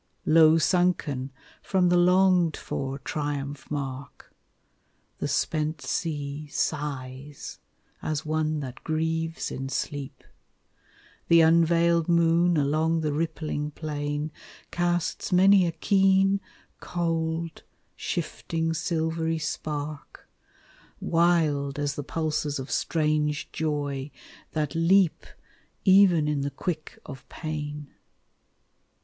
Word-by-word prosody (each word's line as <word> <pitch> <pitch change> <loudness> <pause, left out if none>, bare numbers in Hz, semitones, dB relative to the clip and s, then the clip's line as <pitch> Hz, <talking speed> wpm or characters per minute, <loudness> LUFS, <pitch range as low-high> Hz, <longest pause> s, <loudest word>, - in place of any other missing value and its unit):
Low 160 0 +6
sunken 165 -7 +1 0.3
from 185 -2 +2
the 180 - +4
longed 180 -2 +4
for 135 0 -4
triumph 145 -1 -4
mark; 140 -2 -6 0.9
The - - -1
spent 155 0 -1
sea 150 -2 -3
sighs 145 -2 -4 0.4
as 155 -1 -3
one 155 0 0
that 130 -2 -8
grieves 160 +1 -2
in 135 0 -4
sleep. 140 -1 -4 1.0
The 170 0 +6
unveiled 170 +1 +4
moon 170 0 +3
along 155 +3 +1
the 150 -2 -1
rippling 150 -1 -2
plain 145 0 -4 0.4
Casts 175 -1 -1
many 190 0 +6
a - - 0
keen, 195 +3 +3 0.4
cold, 165 -1 -2 0.3
shifting 165 0 -2
silvery 160 0 -1
spark, 150 -1 -5 0.7
Wild 160 -5 +2
as 145 -1 -1
the 145 - -4
pulses 155 -1 -2
of 130 0 -6
strange 150 -2 0
joy, 145 -3 -2 0.4
that 150 -2 -1
leap 170 +1 +3 0.6
Even 190 -5 +6
in 150 -2 0
the 140 - -1
quick 155 +2 -5
of 135 - -10
pain. 150 -2 -5
155 Hz, 100 wpm, -26 LUFS, 145-170 Hz, 1.0 s, Low